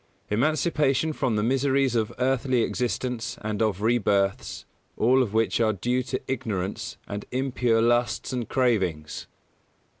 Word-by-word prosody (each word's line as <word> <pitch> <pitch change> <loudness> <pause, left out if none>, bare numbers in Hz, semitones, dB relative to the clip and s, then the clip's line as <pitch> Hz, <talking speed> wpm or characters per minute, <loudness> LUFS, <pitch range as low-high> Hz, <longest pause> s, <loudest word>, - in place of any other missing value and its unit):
Emancipation 155 +3 +1
from 130 -6 0
the 105 - +1
miseries 135 +1 +2
of 110 -3 0
earthly 130 -1 +1
existence 120 +1 -2
and 105 0 -2
of 105 -2 0
rebirths, 100 -4 +1 0.3
all 130 +4 +4
of 120 -6 -1
which 110 +1 +1
are 110 -1 +3
due 125 +6 0
to 130 0 -3
ignorance 110 -3 -3
and 100 0 -5
impure 125 -3 +1
lusts 120 +2 +1
and 125 -3 -3
cravings. 95 -12 0
120 Hz, 130 wpm, -26 LUFS, 110-130 Hz, 0.3 s, all